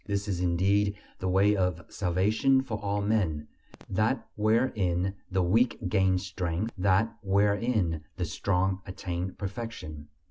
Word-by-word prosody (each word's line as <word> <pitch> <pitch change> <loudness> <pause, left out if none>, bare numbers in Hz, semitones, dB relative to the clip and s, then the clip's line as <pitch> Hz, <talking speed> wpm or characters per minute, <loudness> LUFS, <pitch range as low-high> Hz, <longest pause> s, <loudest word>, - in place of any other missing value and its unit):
This 100 0 -1
is 95 -4 -1
indeed 100 +4 +2 0.2
the 95 - -2
way 100 +3 +4
of 90 -3 -1
salvation 105 +9 +2
for 110 -5 -4
all 100 0 -1
men: 90 -9 0 0.4
that 110 +7 0
wherein 105 -5 +1 0.2
the 95 -1 +1
weak 115 +8 +3
gain 95 -2 +3
strength 95 +2 -3
that 100 +3 +2
wherein 100 -4 +1
the 90 - -1
strong 95 +3 0
attain 90 -1 -4
perfection. 95 -8 -6
95 Hz, 130 wpm, -28 LUFS, 90-105 Hz, 0.4 s, way